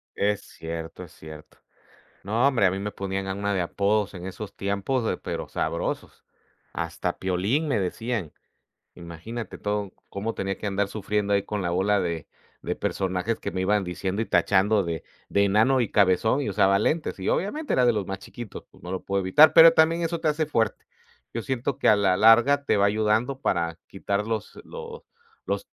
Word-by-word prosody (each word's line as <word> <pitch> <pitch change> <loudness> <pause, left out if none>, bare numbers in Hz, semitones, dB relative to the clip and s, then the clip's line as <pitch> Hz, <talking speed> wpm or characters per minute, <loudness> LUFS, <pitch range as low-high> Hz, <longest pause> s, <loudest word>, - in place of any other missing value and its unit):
Es 105 0 0
cierto, 80 +1 -7
es 85 - -13
cierto, 80 -1 -12 0.7
no 110 +6 +1
hombre, 130 -7 +3
a - - +4
mí 95 - -3
me 105 +1 -4
ponían 95 0 -4
a 95 - -2
una, 100 +1 -2
de 95 - 0
apodos 100 +4 0
en 90 0 -7
esos 100 +2 -7
tiempos, 100 +6 -1
de - - 0
pero - - -5
sabrosos. - - -3 0.5
Hasta - - -3
Piolín 100 - 0
me 135 - +1
decían. 105 -2 -3 0.6
Imagínate 90 +7 -7
todo 105 -1 -3 0.2
cómo 110 +3 -4
tenía 95 0 -3
que - - -5
andar 100 0 0
sufriendo 105 0 -2
ahí 100 -1 +2
con 105 -2 -3
la 85 - -1
bola 95 +3 +2
de 85 -4 -3 0.4
de - - -3
personajes 95 +3 -2
que - - -4
me 95 +1 -2
iban 100 +1 +2
diciendo 95 +3 -3
y 115 - -1
tachando 100 +3 +3
de 85 -2 -4 0.3
de 100 - +3
enano 110 +7 +3
y 120 - -1
cabezón 105 +7 +3
y 110 - -2
usaba 100 0 +3
lentes 155 +7 -1
y 95 - -5
obviamente 295 - -1
era 125 - +3
de 120 - +5
los 105 -3 -2
más 95 0 -4
chiquitos, 120 +1 -9
pues, - - -21
no 90 - -7
lo 95 - -3
puedo 100 0 0
evitar, 145 +12 +6
pero 165 0 +10
también 165 +1 +3
eso 165 0 -2
te 160 - +1
hace 155 +1 +1
fuerte, 115 -8 -1 0.5
yo 115 - -3
siento 130 +3 -2
que - - +2
a 105 - +7
la 95 -2 +2
larga 120 +7 +5
te - - +3
va 100 - +3
ayudando 110 +5 +1
para 85 -9 -1
quitar 100 +1 -3
los 110 -2 -4
los 470 -1 -9 0.4
los - - -2
100 Hz, 195 wpm, -25 LUFS, 95-120 Hz, 0.7 s, pero